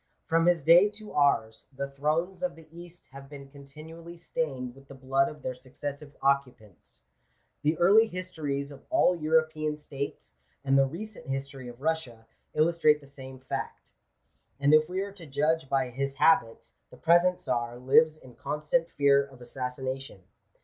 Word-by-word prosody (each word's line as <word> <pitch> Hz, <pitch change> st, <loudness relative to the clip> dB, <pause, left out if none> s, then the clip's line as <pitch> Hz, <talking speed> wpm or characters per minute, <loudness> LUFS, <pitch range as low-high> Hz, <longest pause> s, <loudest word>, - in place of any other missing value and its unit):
From 165 Hz, +1 st, +2 dB
his 175 Hz, -4 st, +3 dB
day 175 Hz, +7 st, +7 dB
to 210 Hz, 0 st, -11 dB
ours, 115 Hz, -6 st, +1 dB
the 140 Hz, 0 st, -5 dB
thrones 155 Hz, +7 st, -1 dB
of 270 Hz, -, -2 dB
the 160 Hz, -1 st, -15 dB
East 175 Hz, +1 st, -13 dB
have 135 Hz, 0 st, -12 dB
been 140 Hz, -2 st, -11 dB
continually 155 Hz, +4 st, -12 dB
stained 135 Hz, -7 st, -4 dB
with 135 Hz, +1 st, -18 dB
the 135 Hz, -, -11 dB
blood 135 Hz, +1 st, +1 dB
of 150 Hz, -2 st, -12 dB
their 130 Hz, -, -2 dB
successive 145 Hz, +3 st, -8 dB
occupants. 120 Hz, -, -2 dB, 0.6 s
The 155 Hz, +2 st, +1 dB
early 205 Hz, +6 st, +6 dB
histories 155 Hz, -7 st, -4 dB
of 140 Hz, -, -13 dB
all 320 Hz, -, +3 dB
European 155 Hz, -1 st, 0 dB
states, 140 Hz, -2 st, -6 dB, 0.3 s
and 135 Hz, 0 st, +3 dB
the 135 Hz, 0 st, +5 dB
recent 195 Hz, +5 st, -8 dB
history 135 Hz, -1 st, -5 dB
of 120 Hz, +1 st, -11 dB
Russia, 145 Hz, -8 st, -2 dB, 0.3 s
illustrate 155 Hz, -1 st, +3 dB
the 145 Hz, -, -17 dB
same 130 Hz, -1 st, -11 dB
fact; 130 Hz, -, -6 dB, 0.7 s
and 140 Hz, +2 st, +3 dB
if 155 Hz, +1 st, +5 dB
we 185 Hz, +1 st, -2 dB
are 200 Hz, 0 st, -5 dB
to 175 Hz, -5 st, -12 dB
judge 150 Hz, +1 st, 0 dB
by 135 Hz, -2 st, 0 dB
his 135 Hz, +2 st, -3 dB
habits, 125 Hz, -6 st, +2 dB, 0.2 s
the -, -, -15 dB
present 175 Hz, +2 st, +4 dB
Czar 120 Hz, -1 st, -2 dB
lives 155 Hz, +5 st, +4 dB
in 130 Hz, -5 st, -15 dB
constant 150 Hz, +6 st, -1 dB
fear 140 Hz, -1 st, +3 dB
of 135 Hz, -2 st, -17 dB
assassination. 130 Hz, -2 st, -5 dB
145 Hz, 165 wpm, -28 LUFS, 135-165 Hz, 0.7 s, day